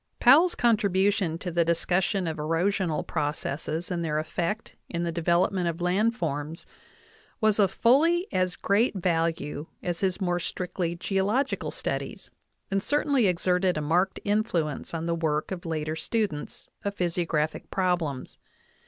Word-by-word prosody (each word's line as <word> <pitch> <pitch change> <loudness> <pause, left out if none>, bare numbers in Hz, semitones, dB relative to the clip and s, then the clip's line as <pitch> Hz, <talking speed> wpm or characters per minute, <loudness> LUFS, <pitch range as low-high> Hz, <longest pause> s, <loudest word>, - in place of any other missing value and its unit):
Powell's 350 +2 +6
contribution 200 -6 +2
to 180 +1 -5
the 170 0 +3
discussion 175 +3 +1
of 160 0 -3
erosional 165 +2 0
processes, 150 +3 -3
and 170 -1 -1
their 155 -2 -1
effect 170 +7 -3
in 170 -1 -2
the 170 - -1
development 175 +2 +1
of 170 0 -2
land 195 +6 +2
forms 150 - -3 0.7
was 215 -1 +3
of 200 -2 +5
fully 330 +9 +3
as 185 -1 +1
great 215 +4 +2
value 165 -4 -1 0.2
as 175 -1 -2
his 190 -1 0
more 175 -2 0
strictly 175 -1 -3
geological 200 +9 0
studies, - - -4 0.4
and 195 0 +1
cer 290 +7 +1
tainly 275 -7 +3
exerted 180 0 +1
a - - -1
marked 175 +6 +1
influence 205 - 0
v 165 - -3
ii 160 - -4
the 170 - 0
work 155 -1 -1
of 175 -2 -5
later 155 -1 -2
stu 220 +7 0
dents 150 -5 -8 0.2
of 200 0 -2
physiographic 165 -4 -1
problems. 175 -8 -1
175 Hz, 150 wpm, -27 LUFS, 165-200 Hz, 0.7 s, Powell's